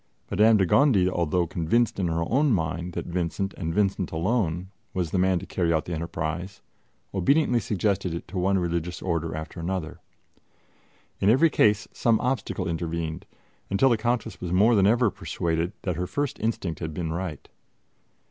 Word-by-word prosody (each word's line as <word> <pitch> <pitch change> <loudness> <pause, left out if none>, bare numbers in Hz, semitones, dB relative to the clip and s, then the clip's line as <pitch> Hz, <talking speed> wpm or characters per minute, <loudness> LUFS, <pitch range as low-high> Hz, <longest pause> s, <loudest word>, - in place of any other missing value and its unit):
Madame 110 +1 +5
de 95 - +3
Gondi, 100 - +4
although 85 -1 +1
convinced 95 +7 0
in 90 - +1
her 85 0 0
own 140 +3 +2
mind 85 -2 -1
that - - -4
Vincent, 90 +2 -2
and 80 -3 -4
Vincent 95 0 0
alone, 90 0 -1 0.2
was 90 -4 -1
the 95 - +1
man 95 0 +3
to - - -5
carry 85 -3 0
out 80 -1 +1
the 90 - -4
enterprise, 85 +3 -4 0.5
obediently 125 - +3
suggested 100 -4 -1
it 85 - -5
to 95 - -4
one 95 +2 +2
religious 85 -1 -2
Order 85 -3 -1
after 80 +2 -7
another. 85 -1 -3 1.2
In 95 - +3
every 145 +8 +5
case 105 -4 +3
some 115 -2 +2
obstacle 125 -2 -2
intervened, 80 -1 -3 0.4
until 100 +7 +3
the 120 - +4
Countess 120 +1 -2
was 90 - -4
more 105 +6 +5
than 100 -3 +4
ever 115 0 +3
persuaded 85 +1 -2
that 90 -4 -2
her 90 0 -2
first 140 +9 -2
instinct 105 -7 -2
had 80 -2 -5
been 80 -2 -2
right. 85 -4 -5
90 Hz, 170 wpm, -26 LUFS, 85-105 Hz, 1.2 s, Madame